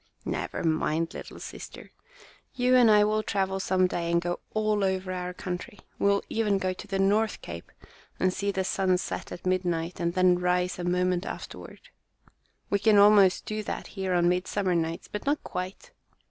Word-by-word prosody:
"Never -, -, -3 dB
mind, 160 Hz, 0 st, 0 dB
little -, -, -9 dB
sister. -, -, -9 dB, 0.6 s
You 250 Hz, 0 st, +3 dB
and 245 Hz, -3 st, +6 dB
I 210 Hz, -1 st, +6 dB
will 215 Hz, +1 st, +1 dB
travel 195 Hz, -2 st, -1 dB
some 185 Hz, -1 st, +2 dB
day 170 Hz, -2 st, -1 dB
and 170 Hz, -, +3 dB
go 175 Hz, +1 st, -3 dB, 0.2 s
all 215 Hz, -1 st, +1 dB
over 190 Hz, -1 st, -1 dB
our 180 Hz, 0 st, -3 dB
country. 180 Hz, +2 st, -6 dB, 0.2 s
We -, -, +2 dB
will 200 Hz, 0 st, +2 dB
even 210 Hz, -3 st, +1 dB
go 185 Hz, -1 st, -1 dB
to 190 Hz, -, -10 dB
the 195 Hz, -1 st, -2 dB
North 205 Hz, +2 st, +2 dB
Cape 85 Hz, 0 st, -8 dB, 0.5 s
and 185 Hz, 0 st, +2 dB
see 200 Hz, +1 st, -2 dB
the 190 Hz, -1 st, 0 dB
sun 185 Hz, -1 st, +1 dB
set -, -, -5 dB
at 175 Hz, -, -8 dB
midnight 175 Hz, -2 st, -1 dB
and 170 Hz, 0 st, -1 dB
then 185 Hz, -1 st, +4 dB
rise 180 Hz, 0 st, 0 dB
a -, -, -3 dB
moment 180 Hz, +1 st, 0 dB
afterward. -, -, -9 dB, 0.8 s
We 200 Hz, -, +2 dB
can 210 Hz, 0 st, +4 dB
almost 200 Hz, -2 st, +6 dB
do 215 Hz, 0 st, -3 dB
that 210 Hz, -, -5 dB
here 190 Hz, -2 st, -1 dB
on 175 Hz, 0 st, +3 dB
midsummer 180 Hz, +1 st, 0 dB
nights, 165 Hz, 0 st, -2 dB
but 210 Hz, +5 st, -6 dB
not 290 Hz, +1 st, +1 dB
quite. 185 Hz, +1 st, -6 dB
185 Hz, 185 wpm, -27 LUFS, 180-205 Hz, 0.8 s, and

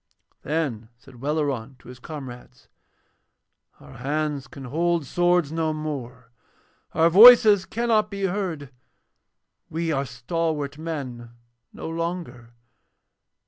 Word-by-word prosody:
Then 135 Hz, -8 st, -3 dB
said 125 Hz, -1 st, -17 dB
Welleran 140 Hz, -4 st, -2 dB
to -, -, -20 dB
his 125 Hz, 0 st, -11 dB
comrades: 130 Hz, -4 st, -10 dB, 1.1 s
'Our -, -, -14 dB
hands 145 Hz, +1 st, -2 dB
can 135 Hz, -, -11 dB
hold 165 Hz, +4 st, 0 dB
swords 175 Hz, 0 st, +1 dB
no 160 Hz, -1 st, -1 dB
more, 130 Hz, -6 st, -6 dB, 0.6 s
our 165 Hz, +1 st, +5 dB
voices 210 Hz, +1 st, +8 dB
cannot 225 Hz, -2 st, +1 dB
be 200 Hz, -1 st, -5 dB
heard, 175 Hz, -8 st, -3 dB, 1.0 s
we 165 Hz, +1 st, -2 dB
are 140 Hz, -2 st, -1 dB
stalwart 145 Hz, +3 st, -3 dB
men 135 Hz, -8 st, -6 dB, 0.4 s
no -, -, -8 dB
longer. 165 Hz, -8 st, -5 dB
155 Hz, 105 wpm, -24 LUFS, 130-170 Hz, 1.1 s, voices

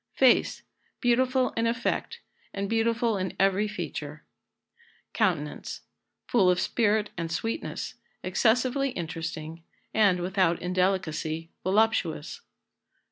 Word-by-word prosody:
Face. -, -, +4 dB, 0.4 s
Beautiful 255 Hz, +1 st, +2 dB
in 230 Hz, 0 st, 0 dB
effect, 240 Hz, -, -2 dB, 0.3 s
and 200 Hz, 0 st, -2 dB
beautiful 230 Hz, 0 st, +1 dB
in 185 Hz, 0 st, -3 dB
every 195 Hz, +2 st, +3 dB
feature. 215 Hz, -, -6 dB, 0.9 s
Countenance. 170 Hz, -9 st, -1 dB, 0.4 s
Full 195 Hz, -7 st, +4 dB
of 180 Hz, 0 st, +3 dB
spirit 215 Hz, -2 st, +1 dB
and 165 Hz, -1 st, -3 dB
sweetness; 225 Hz, -, -3 dB, 0.3 s
excessively 255 Hz, +4 st, +2 dB
interesting, 165 Hz, -1 st, -5 dB, 0.3 s
and, 200 Hz, -5 st, +4 dB
without 180 Hz, -2 st, +1 dB
indelicacy, 180 Hz, -3 st, -1 dB
voluptuous. 190 Hz, -6 st, +1 dB
195 Hz, 95 wpm, -27 LUFS, 175-230 Hz, 0.9 s, Face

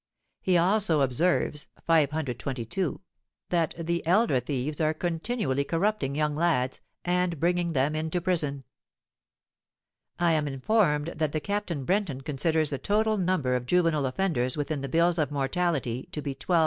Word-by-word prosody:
He 185 Hz, -2 st, +3 dB
also 175 Hz, -3 st, +3 dB
observes 150 Hz, +3 st, +1 dB, 0.2 s
(522) 150 Hz, -, 0 dB, 0.5 s
that 170 Hz, -3 st, +1 dB
'the 170 Hz, 0 st, -2 dB
elder 185 Hz, -, +4 dB
thieves 140 Hz, +4 st, -3 dB
are 155 Hz, 0 st, +2 dB
continually 165 Hz, -, -1 dB
corrupting 170 Hz, -2 st, 0 dB
young 150 Hz, 0 st, +1 dB
lads, 145 Hz, -5 st, 0 dB, 0.2 s
and 180 Hz, -2 st, 0 dB
bringing 175 Hz, 0 st, +1 dB
them 140 Hz, +2 st, +1 dB
into 160 Hz, +3 st, -1 dB
prison.' 155 Hz, -6 st, -1 dB, 1.5 s
"I 175 Hz, -1 st, +3 dB
am 155 Hz, -2 st, +1 dB
informed 150 Hz, -, +1 dB
that 155 Hz, -2 st, -2 dB
Captain 200 Hz, -9 st, -2 dB
Brenton 185 Hz, -8 st, 0 dB
considers 155 Hz, +2 st, 0 dB
the 140 Hz, -, -2 dB
total 215 Hz, +1 st, +1 dB
number 175 Hz, -9 st, +1 dB
of 125 Hz, -1 st, -3 dB
juvenile 165 Hz, -5 st, +2 dB
offenders 130 Hz, -4 st, 0 dB
within 145 Hz, -1 st, -2 dB
the 140 Hz, -, -4 dB
bills 170 Hz, +3 st, +2 dB
of 150 Hz, -, +1 dB
mortality 140 Hz, -3 st, -1 dB
to 150 Hz, -, -3 dB
be 140 Hz, -, -3 dB
12,000. 170 Hz, +6 st, +1 dB
160 Hz, 140 wpm, -27 LUFS, 140-175 Hz, 1.5 s, elder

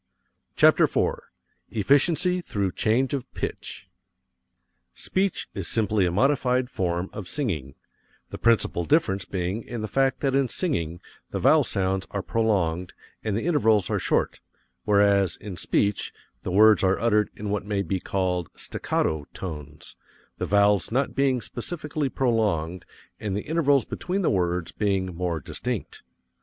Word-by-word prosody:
CHAPTER -, -, +6 dB
IV -, -, 0 dB, 0.5 s
EFFICIENCY 155 Hz, -, +2 dB
THROUGH 100 Hz, -, -2 dB
CHANGE 120 Hz, +8 st, +1 dB
OF 135 Hz, -2 st, -4 dB
PITCH -, -, -5 dB, 1.1 s
Speech 190 Hz, 0 st, -1 dB
is 95 Hz, -4 st, -4 dB
simply 105 Hz, -4 st, +1 dB
a -, -, 0 dB
modified 125 Hz, +3 st, +2 dB
form 90 Hz, -1 st, -2 dB
of 100 Hz, -4 st, -6 dB
singing: 80 Hz, -, -3 dB, 0.6 s
the -, -, -7 dB
principal 115 Hz, -6 st, +2 dB
difference 100 Hz, -, +1 dB
being 95 Hz, +3 st, -2 dB
in 120 Hz, 0 st, -6 dB
the 110 Hz, -, -3 dB
fact 135 Hz, +3 st, +1 dB
that 135 Hz, -2 st, +1 dB
in 135 Hz, -1 st, +3 dB
singing 85 Hz, -, -2 dB, 0.3 s
the -, -, -3 dB
vowel -, -, +5 dB
sounds 95 Hz, 0 st, -1 dB
are 100 Hz, -2 st, -3 dB
prolonged 90 Hz, -7 st, 0 dB, 0.3 s
and 110 Hz, -2 st, -1 dB
the 115 Hz, -, -3 dB
intervals 115 Hz, -, +3 dB
are -, -, +1 dB
short, -, -, 0 dB, 0.5 s
whereas 100 Hz, -3 st, +3 dB
in 100 Hz, -3 st, -7 dB
speech 100 Hz, +3 st, 0 dB, 0.3 s
the -, -, -4 dB
words 105 Hz, +3 st, +6 dB
are 95 Hz, 0 st, +3 dB
uttered 105 Hz, -2 st, +2 dB
in 105 Hz, 0 st, -4 dB
what 105 Hz, -1 st, -1 dB
may 100 Hz, -1 st, -1 dB
be 95 Hz, -1 st, -2 dB
called 90 Hz, -3 st, -1 dB
"staccato" 75 Hz, -2 st, -2 dB
tones, 75 Hz, -4 st, -8 dB, 0.4 s
the -, -, -2 dB
vowels 100 Hz, 0 st, +3 dB
not 130 Hz, +4 st, 0 dB
being 135 Hz, -3 st, +1 dB
specially 150 Hz, +3 st, -4 dB
prolonged 100 Hz, -10 st, 0 dB, 0.3 s
and 100 Hz, -3 st, -2 dB
the 105 Hz, -, -3 dB
intervals 145 Hz, -5 st, +2 dB
between 190 Hz, +3 st, -3 dB
the -, -, +2 dB
words 90 Hz, -2 st, 0 dB
being 95 Hz, -3 st, -1 dB
more 85 Hz, -2 st, -2 dB
distinct. 70 Hz, -, -5 dB
105 Hz, 145 wpm, -25 LUFS, 90-130 Hz, 1.1 s, CHAPTER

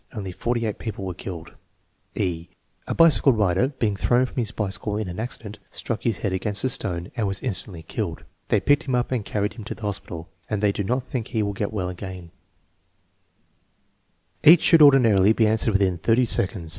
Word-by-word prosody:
Only 95 Hz, -4 st, -5 dB
forty 120 Hz, +5 st, -2 dB
eight 105 Hz, -, -3 dB
people 105 Hz, -4 st, -5 dB
were 95 Hz, -, -4 dB
killed" 85 Hz, -2 st, -8 dB, 0.6 s
(e) 85 Hz, -2 st, -2 dB, 0.4 s
"A -, -, -2 dB
bicycle 160 Hz, -5 st, +6 dB
rider, 105 Hz, +1 st, +2 dB
being 115 Hz, -7 st, -2 dB
thrown 120 Hz, +5 st, +2 dB
from 130 Hz, -, -11 dB
his 115 Hz, -4 st, 0 dB
bicycle 105 Hz, -1 st, -3 dB
in 105 Hz, -2 st, -3 dB
an 90 Hz, +3 st, -6 dB
accident, 110 Hz, -2 st, -5 dB
struck 115 Hz, -2 st, -4 dB
his 115 Hz, -5 st, -1 dB
head 95 Hz, -, 0 dB
against 100 Hz, +2 st, -1 dB
a 130 Hz, -, +2 dB
stone 90 Hz, -8 st, -2 dB
and 110 Hz, -5 st, -1 dB
was 95 Hz, 0 st, -2 dB
instantly 90 Hz, -7 st, -3 dB
killed. -, -, -4 dB, 0.2 s
They -, -, +2 dB
picked 145 Hz, +3 st, +2 dB
him 130 Hz, -, +1 dB
up 125 Hz, +1 st, -1 dB
and 125 Hz, -5 st, -1 dB
carried 105 Hz, 0 st, -2 dB
him 115 Hz, -, -9 dB
to -, -, -5 dB
the 115 Hz, -, -14 dB
hospital, 90 Hz, -4 st, -5 dB, 0.2 s
and 105 Hz, -, -1 dB
they 105 Hz, -1 st, +2 dB
do 100 Hz, -, -3 dB
not 125 Hz, +6 st, -1 dB
think 125 Hz, -3 st, -4 dB
he 110 Hz, -2 st, -1 dB
will 100 Hz, 0 st, -2 dB
get 100 Hz, +1 st, -3 dB
well 95 Hz, -4 st, -2 dB
again" 90 Hz, -1 st, -8 dB, 2.1 s
Each 165 Hz, +4 st, +8 dB
should 165 Hz, -2 st, +6 dB
ordinarily 115 Hz, -8 st, +6 dB
be 110 Hz, -, +2 dB
answered 110 Hz, 0 st, +2 dB
within 95 Hz, -3 st, +1 dB
thirty 120 Hz, +6 st, +3 dB
sec 100 Hz, -4 st, +2 dB
onds. 85 Hz, -5 st, -8 dB
105 Hz, 205 wpm, -24 LUFS, 95-120 Hz, 2.1 s, Each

